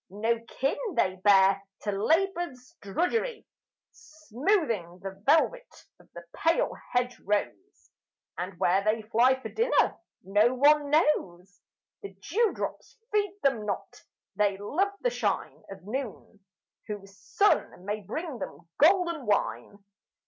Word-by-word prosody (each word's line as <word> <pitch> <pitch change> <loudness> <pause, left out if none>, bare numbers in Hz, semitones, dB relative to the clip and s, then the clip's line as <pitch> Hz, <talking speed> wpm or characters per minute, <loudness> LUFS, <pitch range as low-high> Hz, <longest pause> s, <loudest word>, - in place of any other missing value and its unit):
No 225 +4 0
kin 270 +2 -1 0.2
they 185 0 +1
bear 195 0 +5 0.2
to 205 - -2
labour's 320 - -1
drudgery, 440 - -1 0.5
Smoothing 300 - -2
the 195 0 -7
velvet 415 - +1
of - - -23
the 170 - -9
pale 330 +1 +2 0.2
hedge 245 0 0
rose; 210 - -3 0.4
And 180 +1 -5
where 190 +2 +2
they 215 +1 0
fly 240 +5 +3
for - - -7
dinner 470 +2 +1 0.2
no 210 +6 +3
one 290 +2 +4
knows 200 - 0 0.4
The 200 -1 -8
dew 405 - 0
drops - - -6
feed 410 -2 0
them 265 -6 +2
not 200 - -5 0.3
they 205 -2 +1
love 325 - 0
the - - +1
shine - - -2
Of 195 -2 -10
noon, 225 -2 -6 0.5
whose 195 -2 -7
sun 395 - +1
may 210 +1 -2
bring 270 - -5
them - - -8
golden 340 - +3
wine. 200 -1 -1
240 Hz, 125 wpm, -28 LUFS, 200-325 Hz, 0.5 s, bear